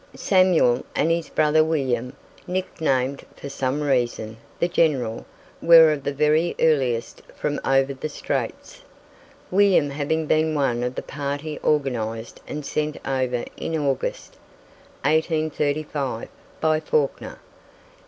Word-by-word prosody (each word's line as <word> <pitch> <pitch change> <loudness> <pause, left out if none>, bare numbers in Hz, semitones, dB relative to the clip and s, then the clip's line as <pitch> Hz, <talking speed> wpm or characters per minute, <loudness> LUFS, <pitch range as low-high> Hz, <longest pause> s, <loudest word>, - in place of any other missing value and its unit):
Samuel, 185 -10 +3
and 160 - +2
his 165 -1 -1
brother 155 +1 +3
William, 130 -6 -1 0.3
nicknamed 140 -7 -1
for 140 - -8
some 135 +1 -2
reason 120 -5 -1 0.2
"The 170 - +2
General," 135 -10 0 0.3
were 165 -2 +8
of 145 -2 -3
the 145 - -1
very 150 +4 +2
earliest 125 -7 +1
from 145 -1 -2
"over 135 0 +2
the 135 +3 -5
straits," - - -4 0.7
William 185 -7 +4
having 155 +3 -1
been 155 +1 +1
one 130 -5 +1
of 125 +1 -2
the - - -4
party 145 +2 -4
organized 120 -6 -1
and 150 -1 -5
sent 150 +1 -2
over 130 -2 -1
in 165 - -2
August, 140 -3 -2 0.7
1835, 150 -4 -1 0.3
by 155 -1 +2
Fawkner. 150 -2 -1
145 Hz, 120 wpm, -23 LUFS, 130-155 Hz, 0.7 s, were